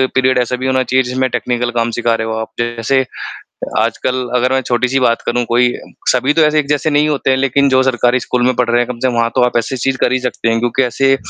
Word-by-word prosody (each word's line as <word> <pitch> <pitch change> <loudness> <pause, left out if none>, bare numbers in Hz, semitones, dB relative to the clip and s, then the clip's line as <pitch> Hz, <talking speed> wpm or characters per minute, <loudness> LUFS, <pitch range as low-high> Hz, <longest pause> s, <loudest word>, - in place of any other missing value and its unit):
period 130 0 +2
ऐसा 125 +1 -2
भी 130 - -1
होना 130 0 +1
चाहिए 130 +1 +1
जिसमें 130 +1 -1
टेक्निकल 120 0 -2
काम 115 0 0
सिखा 115 -1 +1
रहे 110 0 -3
हो 110 - -3
आप, 110 - -6
जैसे 120 +3 0 0.7
आजकल 130 -1 -1
अगर 125 +1 +1
मैं 130 - +2
छोटी-सी 125 +2 0
बात 115 -2 +1
करूँ 120 0 0
कोई 120 +1 +2 0.4
सभी 130 +3 +2
तो 160 - +3
ऐसे 150 0 +3
एक 150 - 0
जैसे 150 +1 0
नहीं 150 +1 +2
होते 145 -2 0
हैं 130 - +3
लेक़िन 135 +1 +2
जो 130 -1 +3
सरकारी 125 -1 +1
स्कूल 125 +1 -2
में 130 - +2
पढ़ 125 - +1
रहे 120 - +3
हैं - - -3
कम 120 - -5
से 130 - 0
कम 125 - -2
वहाँ 115 0 +1
तो 130 - +2
आप 125 - -1
ऐसी 130 +3 -3
चीज़ 135 +2 -1
कर 125 - +1
ही 130 - +2
सकते 125 -2 -2
हैं, 115 - +1
क्योंकि 120 +2 0
ऐसे 135 +2 +2
125 Hz, 265 wpm, -15 LUFS, 120-130 Hz, 0.7 s, तो